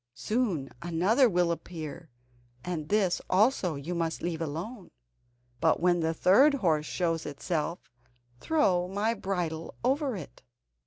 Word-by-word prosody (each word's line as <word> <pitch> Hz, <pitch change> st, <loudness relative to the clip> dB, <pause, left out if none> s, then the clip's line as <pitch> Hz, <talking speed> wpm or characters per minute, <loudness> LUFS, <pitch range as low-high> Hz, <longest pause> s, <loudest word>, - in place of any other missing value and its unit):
Soon 195 Hz, -, -1 dB
another 190 Hz, +10 st, +3 dB
will 175 Hz, -3 st, +2 dB
appear, 165 Hz, -1 st, -6 dB, 0.6 s
and 165 Hz, -4 st, -4 dB
this 200 Hz, -4 st, +2 dB
also 190 Hz, -, +2 dB
you 140 Hz, +5 st, -5 dB
must 165 Hz, -1 st, -2 dB
leave 165 Hz, -1 st, -2 dB
alone, 175 Hz, -, -5 dB, 0.7 s
but 160 Hz, +2 st, +3 dB
when 175 Hz, 0 st, +3 dB
the 160 Hz, -1 st, +1 dB
third 235 Hz, -, +5 dB
horse 160 Hz, -, +1 dB
shows 165 Hz, -3 st, -1 dB
itself, 155 Hz, +1 st, -3 dB, 0.5 s
throw 185 Hz, -, +2 dB
my 205 Hz, +4 st, 0 dB
bridle 175 Hz, -6 st, -3 dB
over 270 Hz, 0 st, +1 dB
it." -, -, -9 dB
175 Hz, 125 wpm, -29 LUFS, 165-210 Hz, 0.7 s, third